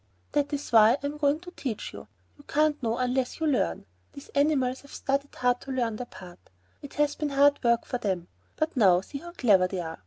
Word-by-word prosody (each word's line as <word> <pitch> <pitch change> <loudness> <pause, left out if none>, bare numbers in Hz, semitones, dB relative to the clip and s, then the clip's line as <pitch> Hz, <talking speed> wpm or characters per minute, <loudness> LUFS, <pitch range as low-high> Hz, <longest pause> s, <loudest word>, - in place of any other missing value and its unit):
"That 290 -1 0
is 290 -1 -4
why 220 0 +7
I 285 +1 -4
am 290 +1 -3
going 295 +1 +1
to 355 0 -10
teach 250 - -5
you. - - -10 0.3
You 290 - -18
can't 300 0 +1
know 230 -1 -1
unless 255 +2 -1
you 320 - 0
learn. 90 - 0 0.3
These 280 - -12
animals 275 -3 +1
have 280 - -17
studied 275 +1 -2
hard 245 0 +1
to 275 - -7
learn 235 -4 -1
their 250 - -6
part. 180 -4 -12 0.4
It 285 - -10
has 295 -1 +2
been 300 -1 -3
hard 285 0 +3
work 235 -1 +2
for 250 - -3
them; 185 -6 -2 0.3
but 310 0 -2
now 190 -7 +5
see 280 +8 -8
how 345 +3 -10
clever 200 - +4
they 185 0 -4
are. 165 -2 -6
265 Hz, 225 wpm, -27 LUFS, 225-290 Hz, 0.4 s, why